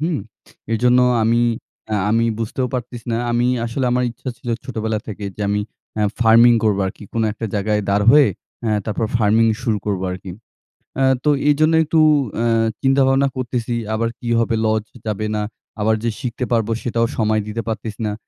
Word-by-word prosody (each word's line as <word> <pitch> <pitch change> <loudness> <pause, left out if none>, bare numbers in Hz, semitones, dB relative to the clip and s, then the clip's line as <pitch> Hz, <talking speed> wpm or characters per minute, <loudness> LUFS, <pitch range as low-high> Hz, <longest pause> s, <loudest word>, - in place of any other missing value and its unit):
হুম? 160 -2 0 0.5
এইজন্য 125 +2 +3 0.2
আমি 115 +1 +3 0.5
অ্যা 105 -1 0
আমি 115 +1 +3
বুঝতেও 115 +3 -2
পারতেছি 120 -1 -5
না। - - +1
আমি 120 +1 +2 0.2
আসলে 125 +3 -2
আমার 125 0 +1
ইচ্ছা 130 +3 -8
ছিল 120 - -10 0.2
ছোটোবেলা 110 -3 -2
থেকে 105 -1 -6
যে - - -10
আমি 105 0 +1 0.4
অ্যা 105 - +1 0.2
ফার্মিং 115 +1 +7
করব 105 -2 +2
আর - - -2
কী। - - -14
কোনো 115 -1 0
একটা 115 +1 -5
জায়গায় 105 +1 0
দাঁড় 100 +1 +2
হয়ে, 145 0 +6 0.3
অ্যা 110 - -1
তারপর 110 +1 -1
ফার্মিং 115 0 +3 0.2
শুরু 110 -3 0
করব 100 -3 -1
আর 90 - -3
কী। 95 - -7 0.7
অ্যা 135 - +3 0.2
তো 150 - +2 0.2
এইজন্য 155 +2 +3
একটু 160 +1 +1 0.4
অ্যা 115 +1 +1 0.3
চিন্তা 135 0 +3
ভাবনা 135 +1 +3
করতেসি 120 -2 -2 0.2
আবার 115 +1 0
কী 120 - -5
হবে, 115 0 +1
লস 110 -1 +1 0.2
যাবে 105 0 -2
না, 105 - -1 0.4
আবার 110 +1 +3
যে 115 - +1
শিখতে 125 -1 -3
পারব, 115 -3 +2
সেটাও 115 -1 0
সময় 110 -1 +1
দিতে 115 +2 -3
পারতেসি 110 -1 -4
না। 105 - -2
115 Hz, 185 wpm, -20 LUFS, 110-125 Hz, 0.7 s, ফার্মিং